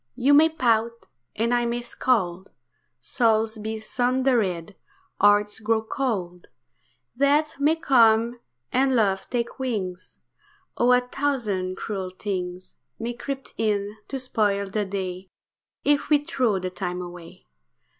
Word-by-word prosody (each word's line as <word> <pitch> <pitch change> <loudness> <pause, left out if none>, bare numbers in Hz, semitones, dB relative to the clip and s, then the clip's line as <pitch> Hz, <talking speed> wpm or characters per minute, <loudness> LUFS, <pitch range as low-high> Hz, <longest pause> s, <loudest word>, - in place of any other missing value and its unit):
You 275 +4 +3
may 310 +3 +7
pout, 235 -7 0 0.3
and 230 +2 0
I 240 -1 +2
may 240 +1 -2
scold, 190 -8 0 0.5
Souls 225 -2 +1
be 220 +1 -4
sundered, 240 -7 0 0.5
hearts 205 +1 +4
grow 220 0 +1
cold; 195 -8 -3 0.7
Death 285 +3 +2
may 300 +3 +3
come, 235 -6 +4 0.3
and 265 0 +2
love 195 -4 +1
take 240 +1 -3
wings; 195 -8 -4 0.6
Oh! 245 +1 +3
a 250 0 +5
thousand 240 -9 -2
cruel 195 -3 -4
things 185 -1 -5 0.2
May 235 +2 -3
creep 270 +2 -6
in 210 -2 0
to 275 - -4
spoil 205 -6 0
the 210 0 0
day, 185 -1 -5 0.5
If 290 0 +2
we 295 -1 +3
throw 255 -10 +1
the 185 0 -4
time 180 -1 -4
away. 175 - -11
220 Hz, 125 wpm, -25 LUFS, 195-255 Hz, 0.7 s, may